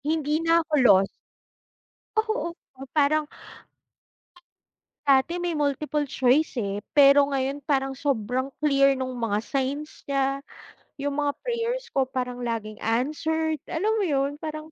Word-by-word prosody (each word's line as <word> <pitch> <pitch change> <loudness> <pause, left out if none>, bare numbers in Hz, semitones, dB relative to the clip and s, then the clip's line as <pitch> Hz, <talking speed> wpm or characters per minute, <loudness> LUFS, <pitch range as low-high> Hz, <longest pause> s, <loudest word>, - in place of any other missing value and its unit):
Hindi 305 0 0
na 330 0 +4
'ko 310 - -12
lost. 195 -3 +6 1.1
Oo, 435 -5 -1
oh 270 +1 -13
parang 305 +1 +3 1.8
dati 280 +4 +3
may 350 -1 -2
multiple 295 0 -1
choice, 265 +3 +2
eh. 200 -3 -2 0.2
Pero 280 0 +7
ngayon 275 0 -2
parang 270 -2 0
sobrang 260 -2 -1 0.2
clear 275 -2 +4
nung 260 0 -3
mga 215 -3 0
signs 280 +2 -3
niya, 275 0 0 0.6
yung 285 0 -3
mga 290 -1 0
prayers 485 +1 -2
ko 265 -1 +1
parang 250 -1 -4
laging 215 -2 -4
answered. 310 +7 -1
Alam 375 +6 0
mo - - +1
yun, 275 -2 +1
parang 310 0 -6
280 Hz, 130 wpm, -25 LUFS, 265-310 Hz, 1.8 s, Pero